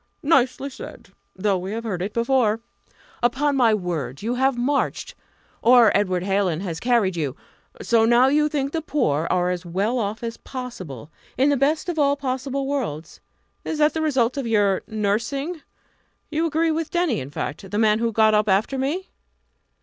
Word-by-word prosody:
"Nicely 275 -2 +2
said! - - -10 0.3
though 195 0 0
we 190 +3 -5
have 230 +1 -4
heard 195 -6 -3
it 195 +3 -2
before. 235 -2 +1 0.6
Upon 275 +4 +1
my 245 -4 +4
word, 165 - -4
you 235 +3 -1
have 265 0 +1
marched! 280 - -1 0.5
or 240 -3 +6
Edward 185 -3 +1
Hallin 190 -4 0
has 170 -5 -4
carried 230 -7 +2
you. 150 -5 -2 0.5
So 230 - +3
now 240 +2 +5
you 300 +2 +3
think 280 -2 -2
the 325 - -2
poor 165 - 0
are 180 0 +1
as 180 0 -4
well 200 +8 -1
off 215 +1 -3
as 230 0 -4
possible, 185 - -8 0.3
in 270 +3 +4
the - - +3
best 285 +5 +1
of 340 -3 -2
all 280 -1 +3
possible 270 0 -3
worlds 245 - -4 0.4
is 315 - -3
that 300 0 +3
the 320 - -2
result 260 -5 +1
of 270 -4 -2
your 205 -4 +2
nursing? 235 - -2 0.7
You 320 +2 +1
agree 325 +1 +1
with 320 0 -2
Denny, 345 - 0
in 130 0 -6
fact? 150 +5 -5
the 205 - -3
man 215 0 +3
who 230 0 0
got 220 0 +4
up 210 0 +2
after 215 +8 +1
me?" 315 +9 -2
235 Hz, 180 wpm, -23 LUFS, 195-275 Hz, 0.7 s, or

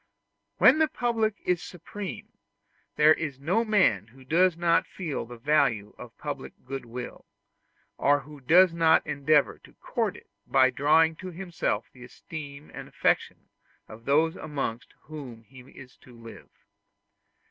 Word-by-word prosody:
When 270 +5 +6
the 315 - +4
public 230 -6 -1
is 180 -1 +1
supreme, 190 +3 -8 0.7
there 155 +1 +6
is 145 -4 -5
no 180 +11 +1
man 185 - +2
who 130 +3 -18
does 170 +4 +3
not 170 -1 +2
feel 160 -10 -5
the 120 0 -10
value 125 -6 +1
of - - -11
public - - -6
goodwill, 125 -2 -7 0.7
or 145 0 +3
who 145 +1 -13
does 175 +6 +5
not 165 -1 +3
endeavor 150 0 +1
to - - -19
court - - -3
it - - -17 0.2
by 130 -1 +4
drawing 160 +5 +3
to 185 - -7
himself 170 - -3
the 125 - -14
esteem 145 +2 -10
and - - -8
affection - - -1 0.4
of 110 +1 -13
those 155 +3 +2
amongst 135 -6 -5
whom 130 -7 -10
he 130 +5 -16
is 130 0 -15
to 125 -2 -17
live. 115 0 -13
150 Hz, 145 wpm, -27 LUFS, 130-170 Hz, 0.7 s, When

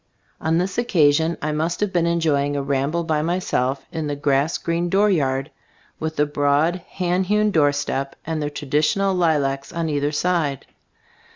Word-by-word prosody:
On 160 +1 +1
this 185 +5 -1
occasion 160 -7 +2
I 155 - 0
must 160 +3 -1
have 205 -2 -1
been 170 -1 +2
enjoying 150 -4 +1
a 140 - -1
ramble 140 +5 0
by 155 -2 0
myself 145 -6 -1
in 160 -2 -3
the 145 - -2
grass 145 +2 +1
green 170 +1 -1
dooryard, 155 -9 +1 0.5
with 160 0 -3
the 150 - +2
broad 145 +4 +1 0.2
hand 180 0 0
hewn 210 +1 +2
doorstep 145 -3 0
and 160 -1 -2
the 145 - -1
tradi 145 0 -1
tional 195 +5 +1
lilacs 140 -6 0
on 165 -1 -2
either 145 0 0
side. 155 -4 0
155 Hz, 165 wpm, -22 LUFS, 145-175 Hz, 0.5 s, occasion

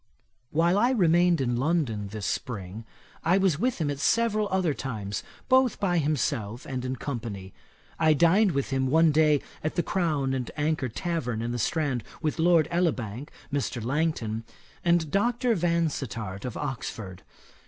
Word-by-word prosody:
While 170 +5 +2
I 240 - +4
remained 175 - +3
in 120 -2 0
London 130 -8 0
this 105 0 -6
spring, 105 -2 -4 0.4
I 180 +3 +4
was 190 -6 +2
with 250 +3 0
him 150 -4 -1
at 140 - -5
several 215 +3 +2
other 185 -5 +1
times, 105 -8 -4 0.3
both 260 -2 +3
by 175 -3 +2
himself 130 -6 -1
and 130 -2 -4
in 130 0 -2
company. 110 -8 -5 0.5
I 155 -1 +4
dined 180 +6 +4
with 140 0 -1
him 130 0 +1
one 160 +3 +4
day 150 -1 +4 0.2
at 155 - -2
the 175 - +1
Crown 155 -8 0
and 130 -2 -2
Anchor 150 -3 0
tavern, 125 -5 -2
in 120 - -2
the 120 - -3
Strand, 140 -2 0 0.2
with 155 0 -2
Lord 165 -2 +4
Elibank, 145 - -1 0.2
Mr. 140 -3 -1
Langton, 130 -6 -1 0.4
and 170 -3 +2
Dr. 240 +5 +2
Vansittart 145 - -1
of 125 - -5
Oxford. 110 -9 -5
150 Hz, 155 wpm, -27 LUFS, 120-170 Hz, 0.5 s, I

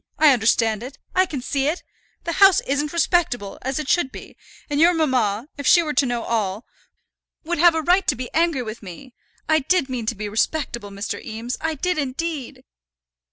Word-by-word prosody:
I 305 -3 +6
understand 225 -2 +2
it. 265 +3 -8 0.2
I 370 0 +3
can 280 -6 -5
see 275 +1 -1
it. 320 +4 -2 0.4
The 335 - -2
house 390 -2 +8
isn't 285 +2 -1
respectable, 330 - 0
as 265 +1 -3
it 305 -2 -3
should 290 -5 +1
be; - - -11 0.3
and 290 -1 -1
your 345 +1 +5
mamma, 255 -7 0
if 285 - -2
she 345 - +6
were 305 -2 -3
to 280 - +3
know 240 -1 -2
all, 215 -2 -2 0.8
would 345 0 -2
have 340 0 +6
a 320 - -1
right 360 +4 +3
to - - +2
be 250 0 -7
angry 325 -5 +1
with 220 0 -7
me. 210 +7 -11 0.3
I 315 0 +4
did 295 0 +1
mean 240 -4 -4
to 235 - 0
be 210 +1 -5
respectable, 235 0 -2
Mr. 200 +1 -5
Eames; 230 +3 -5
I 320 0 -1
did 360 +3 -1
indeed." 285 0 -4
275 Hz, 200 wpm, -22 LUFS, 235-320 Hz, 0.8 s, house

